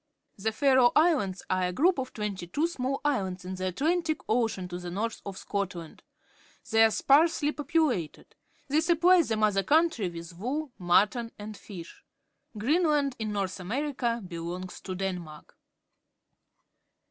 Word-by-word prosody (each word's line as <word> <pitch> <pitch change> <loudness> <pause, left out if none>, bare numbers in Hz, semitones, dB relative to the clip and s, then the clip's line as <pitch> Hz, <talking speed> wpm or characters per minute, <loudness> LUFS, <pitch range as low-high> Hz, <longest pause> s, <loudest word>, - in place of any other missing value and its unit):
The 220 +3 0
Faroe 260 0 +4
Islands 270 - +2
are 185 0 0
a - - -2
group 330 - +2
of 260 -1 -4
twenty 205 -5 -4
two 290 - 0
small 270 -4 -3
islands 190 -10 -1
in 185 - -5
the 185 0 -3
Atlantic 315 - 0
Ocean 220 -5 0
to 175 0 -5
the 180 -1 -6
north 215 +6 -3
of 195 -1 -6
Scotland. 180 -5 -4 0.7
They 225 0 +6
are - - +4
sparsely 300 +5 +3
populated. 290 - -1 0.3
They 295 +3 +2
supply 345 +2 +5
the 225 -8 -1
mother 210 -2 +2
country 295 - +2
with 170 0 -9
wool, 265 - -3
mutton, 210 +6 +2
and 210 +1 -8
fish. 185 -5 -11 0.5
Greenland, 290 +2 +2
in 215 -1 -2
North 200 -2 -2
America, 235 +2 -2
belongs 175 +2 -6
to 185 - -5
Denmark. 180 -5 -5
220 Hz, 145 wpm, -28 LUFS, 185-290 Hz, 0.7 s, They